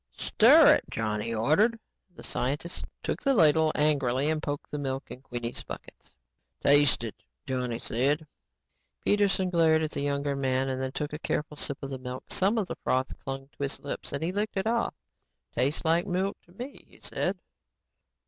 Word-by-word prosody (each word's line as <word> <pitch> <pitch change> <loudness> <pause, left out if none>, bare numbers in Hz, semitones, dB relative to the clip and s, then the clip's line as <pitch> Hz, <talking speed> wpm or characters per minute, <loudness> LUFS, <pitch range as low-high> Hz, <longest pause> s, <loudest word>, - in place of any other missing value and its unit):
"Stir - - +7
it," - - 0
Johnny 110 0 -2
ordered. 155 - +3 0.4
The - - -11
scientist 145 +7 -3 0.2
took - - -2
the 275 -1 +2
ladle 160 -3 +5
angrily 145 -1 +2
and 155 -1 -1
poked 145 -2 -3
at - - -36
the 150 - -3
milk 135 -1 -4
in 125 - -8
Queenie's 120 -2 -5
buckets. - - -11 0.4
"Taste 145 -3 +5
it," 115 - -4 0.3
Johnny 125 -3 -2
said. 140 +7 0 0.8
Peterson 195 -3 +2
glared 160 -2 +4
at 155 - -2
the - - -2
younger 140 0 0
man 135 -1 0
and 130 0 -2
then 130 0 -2
took 150 +2 -4
a 150 - -4
careful 150 -1 -2
sip 140 -1 -2
of 135 - -5
the 130 - -4
milk. 125 0 -6
Some 200 +5 +2
of 205 -4 0
the - - -5
froth 130 +1 0
clung 135 0 -5
to - - -12
his 140 -1 -2
lips 140 - -5
and 140 - -3
he 170 - 0
licked 205 +2 -1
it 190 - 0
off. 230 +1 0 0.6
"Taste 135 +7 0
like 170 +3 +2
milk 190 +2 0
to - - -20
me," 245 +9 -8
he - - -19
said. - - -2
145 Hz, 185 wpm, -28 LUFS, 130-170 Hz, 0.8 s, Stir